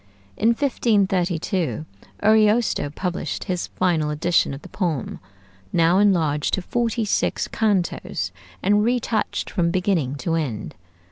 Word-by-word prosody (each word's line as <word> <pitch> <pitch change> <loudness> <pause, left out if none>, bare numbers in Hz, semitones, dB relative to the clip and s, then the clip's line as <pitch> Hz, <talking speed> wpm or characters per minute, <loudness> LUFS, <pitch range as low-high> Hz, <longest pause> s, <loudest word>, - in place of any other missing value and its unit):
In 220 - +1
1532 190 - 0 0.4
Ariosto 215 -5 +3
published 180 +4 -3
his 180 -2 -2
final 165 -5 0
edition 165 +3 +1
of 135 +1 -8
the - - -11
poem, 165 - -2 0.5
now 170 +2 +4
enlarged 165 -8 +2
to 190 - -5
forty 235 +1 -1
six 205 - 0
cantos, 185 - -1 0.3
and 205 +2 +3
retouched 235 -2 -1
from 170 -4 +1
beginning 175 -7 0
to 165 +4 -2
end. 145 -10 -2
180 Hz, 120 wpm, -23 LUFS, 160-210 Hz, 0.5 s, now